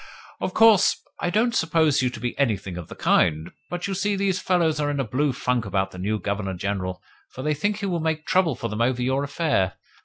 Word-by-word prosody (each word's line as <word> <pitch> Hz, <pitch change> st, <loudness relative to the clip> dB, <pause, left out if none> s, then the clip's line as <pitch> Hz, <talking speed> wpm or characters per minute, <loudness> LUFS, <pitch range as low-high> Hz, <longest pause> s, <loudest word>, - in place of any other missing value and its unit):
"Of -, -, -3 dB
course, 225 Hz, -4 st, +5 dB, 0.2 s
I -, -, 0 dB
don't 225 Hz, +5 st, +2 dB
suppose 160 Hz, -, +2 dB
you 125 Hz, -, +1 dB
to 120 Hz, -2 st, -8 dB
be 120 Hz, +1 st, -3 dB
anything 100 Hz, -9 st, 0 dB
of 85 Hz, -2 st, -7 dB
the -, -, -10 dB
kind, 80 Hz, 0 st, +2 dB, 0.2 s
but, 175 Hz, 0 st, -4 dB
you 200 Hz, -, -2 dB
see, 200 Hz, +2 st, 0 dB
these 195 Hz, -2 st, 0 dB
fellows 165 Hz, -4 st, +1 dB
are 145 Hz, -1 st, 0 dB
in 145 Hz, -1 st, -2 dB
a -, -, +2 dB
blue 135 Hz, +5 st, 0 dB
funk 125 Hz, -2 st, -1 dB
about 95 Hz, -1 st, -1 dB
the 90 Hz, -, -10 dB
new 105 Hz, +4 st, -1 dB
Governor 100 Hz, 0 st, -3 dB
General, 95 Hz, -1 st, -3 dB, 0.3 s
for 130 Hz, -, -8 dB
they 150 Hz, -, +1 dB
think 205 Hz, +8 st, -1 dB
he -, -, -2 dB
will 175 Hz, -3 st, -1 dB
make 160 Hz, -1 st, -2 dB
trouble 180 Hz, -7 st, +2 dB
for 115 Hz, -, -4 dB
them 110 Hz, 0 st, -3 dB
over 125 Hz, +1 st, +1 dB
your 130 Hz, +2 st, +1 dB
affair. 140 Hz, -, 0 dB
135 Hz, 235 wpm, -24 LUFS, 100-170 Hz, 0.3 s, course